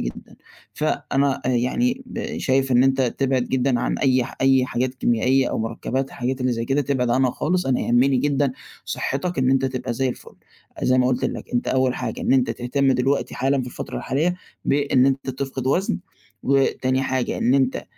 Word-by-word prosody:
جدًا، - - -7 0.4
فأنا 140 0 0
آآ، - - +1
يعني 245 - 0 0.4
شايف 135 0 +1
إن 125 0 +5
أنت 135 0 +2 0.2
تِبعد 135 -2 +1
جدًا 125 -1 0
عن - - -1
أي 130 -3 +2
ح - - -9
أي 135 -1 +4
حاجات 130 +1 -2
كيميائية 130 +1 +2
أو - - -2
مركبات 130 +4 -3
حاجات 130 +2 -3
اللي 125 0 +1
زي 115 0 -2
كده 135 +4 +1
تبعد 125 -3 0
عنها 130 +1 +3
خالص 180 +5 -1
أنا 130 -1 +1
يهمني 130 +3 +3
جدًا 140 0 +1 0.3
صحتك 170 +5 -3
إن 130 0 +3
أنت 135 0 +2
تبقى 130 -2 -2
زي 130 +2 0
الفل، 125 - -8 0.5
زي 130 0 +3
ما 125 - +3
قُلت 130 0 0
لَك - - -3
أنت 120 - 0
أوّل 130 -1 +2
حاجة 115 -3 -4
إن - - +1
أنت 130 -3 +3
تهتم 130 +3 +1
دلوقتي 135 +3 0
حالًا 135 +1 +1
في 125 - -5
الفترة - - -6
الحالية 150 +8 0 0.3
بإن 140 -2 +3
أنت 135 0 0
تفقد 130 0 -4
وزن 180 +8 +1 0.4
وتاني 135 -1 +1
حاجة 130 -2 -1
إن 125 - +2
أنت 130 -1 +1
130 Hz, 185 wpm, -22 LUFS, 125-135 Hz, 0.5 s, إن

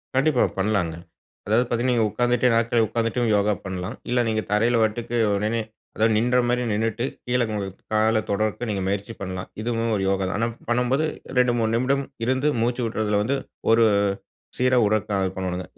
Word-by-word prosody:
கண்டிப்பா. 135 -1 +3 0.2
பண்லாங்க. 95 -5 0 0.5
அதாவது 110 +5 +2
பாத்தீங்கன்னா, 120 +2 +1
நீங்க 115 -2 +2
உட்காந்துட்டே 120 +2 +2
நாற்காலில 115 0 +2
உட்கார்ந்துட்டு 115 +2 0
யோகா 105 +1 +2
பண்லாம். 95 +4 -4
இல்ல 125 0 +2
நீங்க 110 -1 0
தரையில 115 +3 +3
வட்டுக்கு, 115 +2 -1 0.2
உடனே 110 +3 0 0.3
அதாவது 110 +1 +3
நின்ற 125 +3 +2
மாரி 125 0 +1
நின்னுட்டு, 115 +3 -1 0.2
கீழ 125 0 +1
உங்க 100 -2 -2 0.3
கால 110 +1 +3
தொடுரதுக்கு 110 +3 -1
நீங்க 100 -2 -1
முயற்சி 100 +3 -2
பண்ணலாம். 95 -1 -5
இதுவும் 115 0 -1
ஒரு 100 - -1
யோகா 95 0 0
தான். - - -3
ஆனா, 115 - +1 0.2
பண்ணும்போது 125 +5 +1 0.3
2:00 125 -1 +4
3:00 110 -1 +1
நிமிடம் 135 +4 +1 0.2
இருந்து 130 +4 +1
மூச்சு 120 +2 0
விட்ரதுல 105 -2 0
வந்து 135 +6 0 0.4
ஒரு, 115 +1 +5 0.7
சீரா 130 0 +3
உடற்கா 105 0 0 0.2
பண்ணுவாங்க. 90 -1 -3
115 Hz, 165 wpm, -24 LUFS, 105-120 Hz, 0.7 s, ஒரு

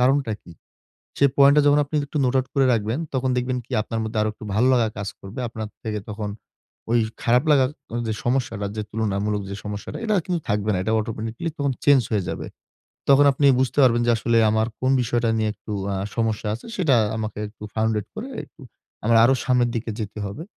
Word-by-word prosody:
কারণটা 130 -2 +2
কি? 85 - -13 0.7
সে 140 - +4
point 140 0 +7
টা - - +7
যখন 145 0 +5
আপনি 145 - -11
একটু 150 - -3
note 125 +1 +2
out 130 - 0
করে 135 -2 +4
রাখবেন, 110 +2 0 0.2
তখন 130 0 +1
দেখবেন 125 +1 -1
কি 125 - -14
আপনার 115 +1 -4
মধ্যে 110 0 -3
আরো 105 - +1
একটু 110 - -12
ভালো 115 +5 +3
লাগা 120 -3 +3
কাজ 100 -1 -3
করবে। 100 +7 -8
আপনার 110 -1 -6 0.2
থেকে 110 -1 -2
তখন 105 0 -4 0.6
ওই 120 - +4 0.2
খারাপ 125 +2 +3
লাগার 135 -3 +4 0.2
আ - - -1
যে 110 - -1
সমস্যাটা 120 -5 0
যে 110 - -1
তুলনামূলক 105 -1 -1
যে - - -4
সমস্যাটা 105 -1 -6
এটা 215 -2 +1
কিন্তু 180 -2 -1
থাকবে 105 +1 0
না। 95 - 0
এটা 110 - -1
automatically 115 +7 -4
তখন 140 -1 +1
change 140 -4 +5
হয়ে 100 -4 +1
যাবে। - - -5 0.6
তখন 140 +1 +7
আপনি 140 +2 +2
বুঝতে 130 +1 -1
পারবেন 120 -2 +4
যে, - - +4
"আসলে 115 +1 +2
আমার 110 +1 +2
কোন 130 - +1
বিষয়টা 120 0 0
নিয়ে 110 0 +1
একটু 110 - -9 0.2
আ - - -1 0.2
সমস্যা 110 -2 -1
আছে 115 - -9
সেটা 160 -9 +3 0.2
আমাকে 110 -1 -4
একটু 105 0 -12
founded 110 -2 0
করে 225 +5 -6 0.2
একটু - - -22 0.4
আমরা 115 +1 +5
আরো 130 - +5
সামনের 125 -2 +2
দিকে 115 0 -3
যেতে 105 0 -5
হবে।" 100 +11 -6
115 Hz, 210 wpm, -23 LUFS, 110-130 Hz, 0.7 s, point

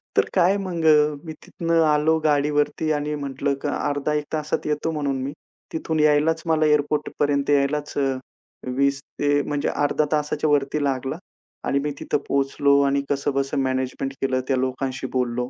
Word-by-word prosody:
तर - - +4
काय 185 +2 +4
मग 180 -4 -3
अ, 150 -1 +5
मी 160 - -6
तिथनं 165 -1 0
आलो 155 +1 +3
गाडीवरती 150 +1 +1
आणि 150 0 -2
म्हटलं, 140 -1 -2
"अर्धा 145 +1 -1
एक 150 0 -1
तासात 155 -1 -2
येतो," 150 +2 -1
म्हणून 145 -3 -1
मी. 140 +2 -4 0.4
तिथून 160 0 -2
यायलाच 150 +2 +3
मला, 160 -1 +3
एअरपोर्टपर्यंत 145 -1 +1
यायलाच 145 +1 +1
अ, - - +2 0.8
20 140 0 +2 0.2
ते 145 0 +3
म्हणजे 145 0 -1
अर्धा 145 +1 +1
तासाच्या 150 0 0
वरती 145 0 +1
लागला 135 -1 -1 0.5
आणि 140 - +2
मी 150 - -1
तिथं - - 0
पोहोचलो 140 +1 +2
आणि 140 0 +1
कसंबसं 140 0 -1
मॅनेजमेंट 130 0 -2
केलं 130 -1 +1
त्या 135 - +1
लोकांशी 130 0 -2
बोललो 125 -1 -1
145 Hz, 155 wpm, -23 LUFS, 140-150 Hz, 0.8 s, अ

